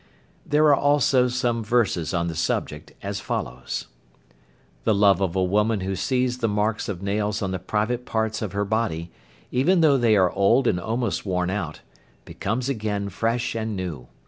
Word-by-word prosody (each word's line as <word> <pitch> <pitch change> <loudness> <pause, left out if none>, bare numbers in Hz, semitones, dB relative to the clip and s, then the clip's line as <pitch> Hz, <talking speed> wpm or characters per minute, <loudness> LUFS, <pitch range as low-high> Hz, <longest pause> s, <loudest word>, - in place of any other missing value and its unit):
There 150 +1 +3
are 145 -2 +6
also 140 -3 +3
some 120 -2 -1
verses 105 -8 +1
on 85 -2 0
the 85 - -3
subject, 75 -2 -2
as - - -3
follows: 60 +1 -4 1.0
"The 110 - +2
love 100 -2 +4
of 95 -2 0
a 95 - +2
woman 105 +3 +1
who 95 +1 -2
sees 125 +5 0
the 115 - +1
marks 105 +1 -1
of 95 -2 -5
nails 105 +1 -1
on 95 - -1
the 95 - -2
private 110 +6 -1
parts 110 -2 -1
of 105 -4 -3
her 100 0 0
body, 100 -6 -1 0.4
even 165 +8 +3
though 145 -4 +5
they 115 -3 +4
are 95 -3 +4
old 115 +7 +3
and 90 - +2
almost 115 +3 -2
worn 90 -2 -1
out, 85 -7 -4 0.4
becomes 115 +6 -3
again 105 -6 -2
fresh 115 +5 -1
and 110 -1 -3
new. 85 -10 -5
105 Hz, 175 wpm, -24 LUFS, 95-120 Hz, 1.0 s, are